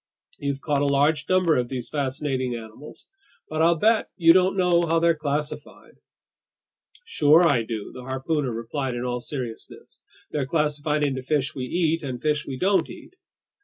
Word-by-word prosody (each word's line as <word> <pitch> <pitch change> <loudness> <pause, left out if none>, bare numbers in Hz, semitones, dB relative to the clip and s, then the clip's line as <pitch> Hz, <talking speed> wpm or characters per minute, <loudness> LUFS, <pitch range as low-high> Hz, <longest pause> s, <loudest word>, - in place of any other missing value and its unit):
You've 140 -1 -3
caught 145 -2 0
a 145 - +2
large 145 +2 +1
number 185 -3 +3
of 120 -1 -1
these 125 -3 -4
fascinating 130 -3 -2
animals. 115 +5 -11 0.4
But 155 0 -2
I'll 170 +1 +4
bet 220 +6 +2
you 165 -3 +6
don't 185 +1 +3
know 175 -2 +3
how 165 +1 +2
they're 170 0 +4
classified." 150 -1 -5 1.1
"Sure 160 - +4
I 140 -7 +3
do," 110 -2 -5
the 125 - -9
harpooner 130 +2 -2
replied 120 +3 -4
in 120 - -3
all 125 0 -2
seriousness. 120 -3 -8 0.3
"They're 140 -3 -2
classified 150 0 0
into 135 -2 -1
fish 140 +1 -1
we 130 -2 -4
eat 165 +3 0
and 130 -4 -5
fish 150 +1 -1
we 130 - -5
don't 195 +6 +1
eat!" - - -12
145 Hz, 165 wpm, -24 LUFS, 130-160 Hz, 1.1 s, you